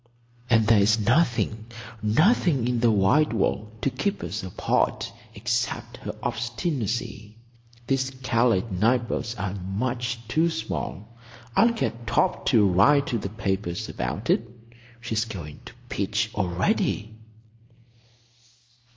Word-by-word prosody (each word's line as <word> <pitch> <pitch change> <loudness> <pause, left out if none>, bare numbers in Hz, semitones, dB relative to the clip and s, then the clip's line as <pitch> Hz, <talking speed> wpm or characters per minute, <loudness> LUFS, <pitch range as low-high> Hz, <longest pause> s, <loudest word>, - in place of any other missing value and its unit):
"And 115 -3 +4
there's 110 0 +4
nothing—nothing 120 - +1
in 125 -1 0
the 120 0 +4
wide 110 +8 +3
world—to 110 +2 -1
keep 200 +11 -2
us 90 +5 -4
apart 95 -2 -1 0.2
except 120 +3 -2
her - - -6
obstinacy. 120 - -3 0.5
These 135 0 0
Calais 115 -5 +3
night 115 +6 +2
boats 115 +1 -3
are 100 -3 -3
much 115 +5 -3
too 160 +8 +2
small. 110 - -5 0.4
I'll 230 - +6
get 120 - -3
Torp - - +1
to 105 -2 +5
write 125 +11 +4
to 115 - +1
the 100 - -4
papers 95 -4 -3
about - - -2
it. - - +3 0.6
She's 115 -1 -1
beginning 85 -9 -8
to - - -10
pitch - - -1
already." 95 +3 0
115 Hz, 115 wpm, -25 LUFS, 100-120 Hz, 0.6 s, I'll